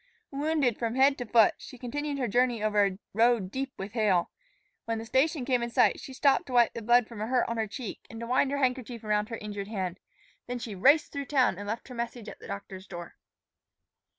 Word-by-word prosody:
Wounded 285 -4 0
from 230 0 -1
head 270 +1 +5
to 245 - -4
foot, 225 -2 +5
she 265 - -11
continued 285 +4 -3
her 255 -3 -1
journey 240 0 +1
over 210 -1 +3
a 195 -2 0 0.2
road 225 -3 +3
deep 265 +2 -3
with 195 +1 -6
hail. 205 -6 +1 0.5
When 230 0 -1
the 225 - -6
station 265 +4 +1
came 250 -2 +1
in 235 - -2
sight, 235 -3 +3
she - - -9
stopped 280 +6 +2
to 255 - -6
wipe 240 -2 +4
the 230 - -5
blood 240 +1 +4
from 230 -3 -8
a 215 - -2
hurt 250 0 +2
on 230 - -3
her 220 -1 0
cheek 225 +1 -6
and 225 - -9
to 235 - -5
wind 255 +3 +2
her 285 - -1
handkerchief 250 -3 -1
around 210 0 0
her 230 - -4
injured 205 -2 -6
hand. 190 -4 -4 0.5
Then 245 0 -3
she 230 -3 -6
raced 280 - +4
through 280 0 -4
town 255 -8 +2
and 205 - -6
left 225 +3 -4
her 255 - -9
message 235 -1 -5
at - - -11
the - - -11
doctor's 195 -1 -7
door. 175 -2 -8
235 Hz, 235 wpm, -28 LUFS, 210-260 Hz, 0.5 s, head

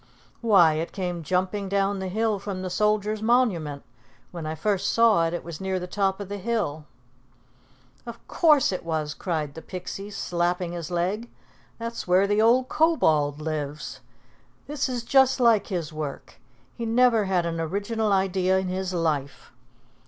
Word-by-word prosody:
"Why, 195 -9 +5
it 160 +2 -3
came 180 -3 -3
jumping 185 +4 -1
down 200 0 0
the 190 - -3
hill 215 +2 0
from 190 -2 -5
the 185 - -4
Soldiers' 210 +2 +1
Monument. 205 - +1 0.5
When 170 -3 -6
I 155 - -3
first 195 +4 0
saw 220 -8 +4
it, 165 - -4
it - - -5
was 170 -1 -8
near 190 -1 -1
the 180 - -5
top 195 +1 -1
of 200 - -6
the 205 +1 -5
hill." 190 -9 -2 1.2
"Of 235 0 -10
course 300 -8 +4
it 185 - -4
was!" 155 -3 -2
cried 155 -5 -3
the 160 - -9
Pixie, 190 +3 -7
slapping 175 -2 -1
his 170 -1 -5
leg. 185 +7 -2 0.5
"That's 230 -2 -5
where 185 +2 +4
the 205 +1 +2
old 245 +3 +4
Kobold 155 - +2
lives. 150 -1 -4 0.7
This 290 -2 -2
is 245 -2 -3
just 265 +2 +4
like 230 -4 +4
his 170 -5 -4
work. 150 -3 -6 0.4
He 235 - -5
never 230 -1 +3
had 185 -3 +1
an 165 -1 -2
original 205 +6 -1
idea 190 -1 +2
in 190 -1 -1
his 185 0 -3
life." 150 -5 -2
190 Hz, 165 wpm, -25 LUFS, 170-215 Hz, 1.2 s, Why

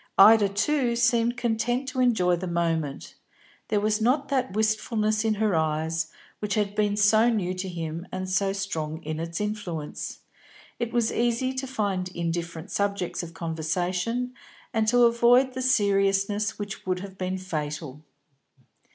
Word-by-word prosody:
Ida, 210 0 +8
too, 240 +4 +1
seemed 235 0 +2
content 240 +2 0
to 260 - -4
enjoy 210 -8 +3
the 180 +2 -5
moment; 165 -4 -2 0.5
there 210 -2 +1
was 210 +1 +1
not 265 +5 +2
that 260 -7 0
wistfulness 215 0 +1
in 220 -1 +1
her 210 -1 +1
eyes 160 0 0 0.3
which 210 -1 -2
had 205 -2 0
been 205 -1 +1
so 215 +3 +5
new 195 -6 0
to 185 +1 -4
him 165 0 -5
and 185 0 -4
so 195 +1 +1
strong 165 -5 -4
in 155 +1 -4
its 165 0 -4
influence. 200 -8 -4 0.6
It 235 -1 -2
was 235 -2 +1
easy 240 +2 +1
to 260 +1 -4
find 200 -7 -1
indifferent 170 +1 -3
subjects 200 -3 -1
of 165 -1 -9
conversation, 180 +9 -2 0.4
and 220 -1 +1
to 245 +2 +5
avoid 240 +2 +4
the 260 - -4
seriousness 205 -3 +2
which 205 -1 -6
would 185 -1 0
have 195 -1 -8
been 185 0 -2
fatal. 150 -5 -5
200 Hz, 150 wpm, -26 LUFS, 175-230 Hz, 0.6 s, Ida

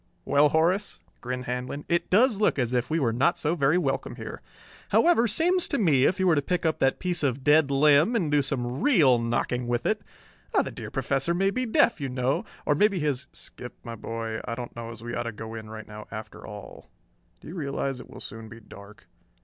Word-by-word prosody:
"Well, 145 +1 +4
Horace," 175 +7 +1 0.2
grinned 125 +1 -4
Handlon, 125 +4 -4
"it 170 0 0
does 220 +1 +3
look 210 - +3
as 125 -2 0
if 125 -1 0
we 160 +1 +1
were 120 -6 +1
not 140 +9 +2
so 150 +2 0
very 150 0 +2
welcome 135 -6 -1
here. - - -8 0.5
However, 335 -9 +4
seems 345 - +2
to 280 - 0
me 145 - +3
if 185 - +1
you 190 - +2
were 175 - +5
to 145 - +2
pick 175 +4 -2
up 160 - +1
that 135 0 +2
piece 180 -2 -2
of 135 -2 -1
dead 150 0 +5
limb 150 - +4
and 170 -10 0
do 145 -1 +4
some 130 -1 -3
real 150 - +5
knocking 120 +1 -1
with 120 0 -1
it.... - - +1 0.6
The - - -1
dear - - -7
Professor 140 +5 0
may 195 +2 +2
be 255 +4 -2
deaf, 220 - +3
you 135 - -2
know, 125 +1 -1 0.2
or 150 - +3
maybe 200 +5 +3
he's 140 -3 -1
" - - -44
"Skip, 125 0 -10
my 115 - -6
boy, 115 0 -5
I 115 - -4
don't 120 0 -7
know 115 -1 -6
as 115 -1 -10
we 120 0 -5
ought 120 - -1
to - - -5
go 110 +1 -8
in 110 -1 -8
right 110 -1 -9
now 105 0 -10
after 110 -1 -8
all. 105 -1 -10 0.5
Do - - -12
you - - -7
realize 140 -5 -3
it - - -12
will - - -11
soon 110 +1 -8
be 115 0 -11
dark?" 100 -3 -14
140 Hz, 230 wpm, -26 LUFS, 120-170 Hz, 0.6 s, were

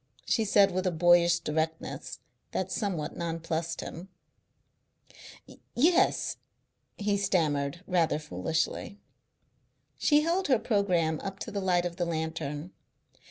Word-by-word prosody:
she 225 - +2
said 200 -1 +4
with 185 +1 -1
a - - +2
boyish 175 +1 +5
directness 160 +1 -3 0.3
that - - -2
somewhat 175 -8 -2
nonplussed 165 0 -3
him. 175 +4 -8 1.7
"Yes," 345 +9 +3 0.6
he 205 -1 0
stammered 160 -4 0
rather 170 -4 +2
foolishly. 155 - -3 1.0
She 295 -1 +4
held 345 +4 0
her 260 -3 +4
programme 180 -8 +1
up 195 -1 -6
to - - -5
the 200 - -2
light 180 -2 +2
of 175 0 -4
the 175 - 0
lantern. 160 -1 -3
175 Hz, 115 wpm, -29 LUFS, 160-200 Hz, 1.7 s, boyish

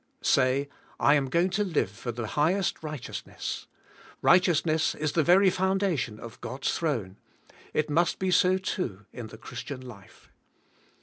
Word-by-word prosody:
Say, 130 +2 +3 0.3
I - - +5
am 140 -3 +2
going 170 +6 +2
to 210 +2 +1
live 165 - 0
for 120 +4 -5
the 115 0 -4
highest 170 - +1
righteousness. 150 -5 -6 0.6
Righteousness 165 -3 +3
is 155 -1 -1
the 165 - +2
very 185 +4 +5
foundation 185 - 0
of 115 -1 -10
God's 130 +2 -2
throne; 115 - -2 0.5
it 155 - 0
must 165 +3 +2
be 190 -1 -1
so 185 +1 +4
too 130 - -4
in 120 -3 -7
the 110 - -11
Christian 130 +3 -7
life. 115 -7 -14
150 Hz, 145 wpm, -28 LUFS, 125-180 Hz, 0.6 s, I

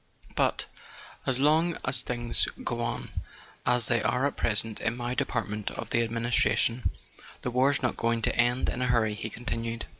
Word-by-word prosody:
"But, - - +1 0.6
as 130 -1 +1
long 160 +4 +3
as 125 0 +5
things 120 -1 0 0.2
go - - -2
on - - -3 0.6
as 125 -2 +5
they 120 0 +2
are 125 +5 +1
at 140 - -1
present 110 0 +1
in 115 +1 -1
my 120 0 -3
department 105 -3 -2
of - - -7
the 115 - +3
administration, 115 +1 +1 0.5
the 125 - -2
war's 135 +3 +2
not 125 - 0
going 115 -1 0
to - - +1
end 120 +1 +2
in 125 - -2
a 125 - +1
hurry," 115 -3 +2
he 110 +1 -5
continued. 115 0 -4
120 Hz, 175 wpm, -28 LUFS, 115-125 Hz, 0.6 s, as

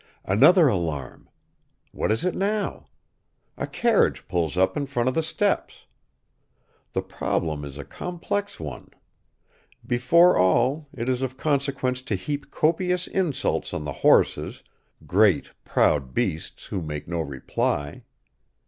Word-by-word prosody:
Another 155 - +6
alarm! 85 - -3 0.6
What - - -1
is 110 +11 0
it 185 - +1
now? 205 +1 -2 0.7
A - - -4
carriage 235 -3 +1
pulls 85 -1 -1
up 95 +1 +2
in 145 -2 -2
front 125 -3 -1
of 130 - +2
the 160 - +1
steps. 160 - -1 1.1
The - - -1
problem 75 -3 -2
is 70 -1 -8
a 75 - -7
complex 200 +3 -4
one. - - -7 1.0
Before 165 +9 +4
all, 125 - +2
it 120 -1 -5
is 130 -1 0
of 130 0 -3
consequence 135 -3 0
to 130 -6 -2
heap 145 +10 -4
copious 180 +3 +1
insults 175 -8 -1
on - - -3
the 70 -2 -4
horses, - - +3 0.4
great, 100 -3 +3
proud 65 -4 +1
beasts, 80 - -2
who 95 - -4
make 75 -2 -5
no 85 0 -2
reply. 70 0 -2
125 Hz, 130 wpm, -25 LUFS, -, 1.1 s, Another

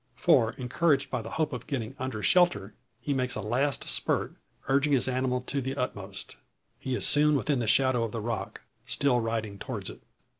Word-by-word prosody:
For 125 -7 +3
encouraged 140 +3 0
by 125 - -1
the 115 - -8
hope 155 -2 0
of 125 -2 -6
getting 130 -4 -3
under 125 -5 -4
shelter, 110 - +3 0.3
he 140 +4 -2
makes 130 -2 0
a - - -3
last 130 +7 -1
spurt, - - 0 0.3
urging 140 +2 +2
his 130 - +2
animal 130 0 0
to 140 +2 -3
the 135 +1 -3
utmost. 100 -7 -5 0.4
He 130 -1 -2
is - - -1
soon 150 0 +5
within 140 0 0
the 115 - -2
shadow 130 +1 +3
of 115 - -3
the 115 - -4
rock, 115 +1 -4 0.3
still 140 -3 +2
riding 110 -3 -3
towards - - -5
it. - - -14
125 Hz, 190 wpm, -28 LUFS, 115-140 Hz, 0.4 s, soon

